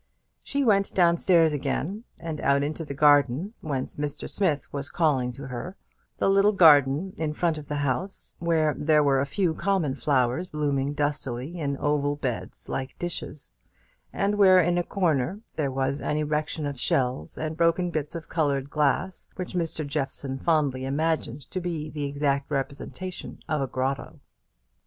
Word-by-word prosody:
She 280 0 -1
went 200 -5 +2
down 170 -2 +4
stairs 165 -3 +4
again, 190 - -2
and 160 -2 -5
out 140 +1 +3
into 155 +3 -3
the 140 -3 -6
garden, 145 - +4
whence 140 -4 -4
Mr. 145 -1 -3
Smith 155 -9 0
was 140 0 -3
calling 135 -7 +1
to 140 +3 -9
her 130 +9 -6 0.4
the - - +1
little 195 +2 +4
garden 155 0 +5
in 155 -1 -1
front 160 -1 0
of 145 - -11
the 150 - -3
house, 170 +9 -3
where 160 -3 +2
there 150 0 +3
were 135 -2 +3
a 140 - -1
few 175 +2 0
common 185 -6 0
flowers 135 +4 +1
blooming 145 -3 -1
dustily 145 +1 -2
in 140 -3 -1
oval 145 0 +1
beds 130 -5 -5
like 130 0 -4
dishes; 175 -4 -5 0.6
and 205 +1 0
where, 185 -2 +7
in 175 0 +2
a - - 0
corner, 175 0 0
there 145 -3 0
was 135 +2 -1
an 150 - -1
erection 150 0 -1
of 140 -3 -4
shells 125 - 0
and 155 0 -3
broken 170 +2 +2
bits 155 0 -3
of 165 -2 -6
coloured 140 -4 0
glass, 150 +5 0
which 185 -1 -5
Mr. 165 -3 -1
Jeffson 140 -2 -3
fondly 145 -6 +1
imagined 150 -1 -1
to 185 - -2
be 160 -3 -4
the 145 -2 -3
exact 140 -1 0
representation 145 +6 -4
of 155 -2 0
a 135 - 0
grotto. 130 +2 -3
150 Hz, 165 wpm, -26 LUFS, 140-170 Hz, 0.6 s, where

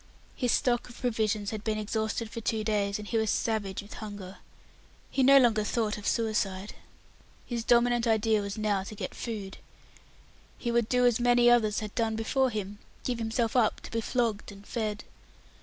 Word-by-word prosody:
His 245 -3 0
stock 245 -3 +1
of 245 - -13
provisions 220 -4 0
had 215 -1 -5
been 220 -1 -1
exhausted 220 +1 -2
for 230 - -5
two 220 0 -1
days, 205 -2 0
and 210 -1 -8
he 230 - 0
was 220 -1 0
savage 205 -4 -1
with 205 - -11
hunger. 205 -3 -8 0.7
He 270 - +1
no 275 +2 +8
longer 230 -5 +4
thought 215 0 0
of 210 - -6
suicide. 210 -4 -1 0.7
His 235 -2 -3
dominant 240 0 +3
idea 220 -1 +2
was 200 +1 -5
now 210 -2 +1
to 215 - -8
get - - -5
food. 205 -5 -6 1.0
He 240 - -2
would 235 -2 +1
do 250 0 +3
as 245 -2 +3
many 245 0 +5
others 220 -3 +3
had 210 -1 -6
done 225 -2 0
before 260 +4 +1
him 205 -2 -5 0.2
give 245 -2 -2
himself 225 +1 -1
up 235 -4 +3
to - - -10
be 230 - -1
flogged 225 -4 -1
and 200 0 -13
fed. 215 -2 -3
220 Hz, 185 wpm, -29 LUFS, 210-235 Hz, 1.0 s, no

